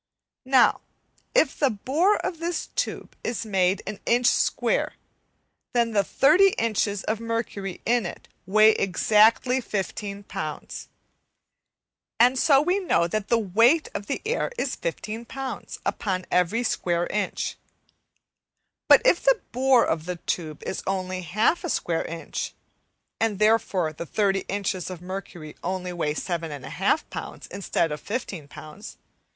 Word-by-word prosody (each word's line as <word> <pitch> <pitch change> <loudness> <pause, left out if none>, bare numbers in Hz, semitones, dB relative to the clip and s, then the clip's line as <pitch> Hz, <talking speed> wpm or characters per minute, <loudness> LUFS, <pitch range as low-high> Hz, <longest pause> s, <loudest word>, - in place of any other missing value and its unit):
Now 260 -2 +4 0.5
if 320 - +3
the 280 - +4
bore 290 - +1
of 335 - -4
this 340 +1 -3
tube - - -3
is 230 -1 -3
made 190 -2 +1
an 210 0 -5
inch 240 +1 +3
square, - - +2 0.8
then 235 -1 +2
the 205 -2 +2
30 335 - +4
inches 210 -3 0
of 220 0 -1
mercury 230 -4 -4
in 235 -5 +2
it - - -10 0.2
weigh 215 +3 +6
exactly 220 +7 +3
15 200 -1 -4
lbs, - - -6 1.3
and 250 +2 +5
so 280 -1 +5
we 360 +5 +1
know 355 - +2
that 210 +3 -2
the 235 - +3
weight 230 - +3
of 205 - -5
the 275 - -3
air 470 +2 -1
is - - -1
15 230 - -5
lbs. 270 +1 -6
upon 185 -3 -2
every 180 +7 +2
square 175 -6 0
inch, 205 -1 -2 1.3
but - - +7
if - - +4
the - - +4
bore 255 -1 +4
of 160 -1 -1
the 180 - -2
tube 160 -3 -4
is - - -3
only 185 -1 -2
half 215 - +1
a 350 - -3
square 165 - -1
inch, 165 0 -5 0.6
and 220 -3 +1
therefore 205 -6 +2
the 170 +2 -7
30 195 0 +1
inches 195 -2 -2
of 185 -2 -7
mercury 180 -4 -7
only 180 0 -3
weigh 155 -3 -1
7 170 0 -3
1/2 145 -3 -1
lbs. - - -7
instead 180 -4 -1
of 150 - -5
15 200 - -5
lbs. 155 +7 -10
210 Hz, 145 wpm, -25 LUFS, 185-245 Hz, 1.3 s, but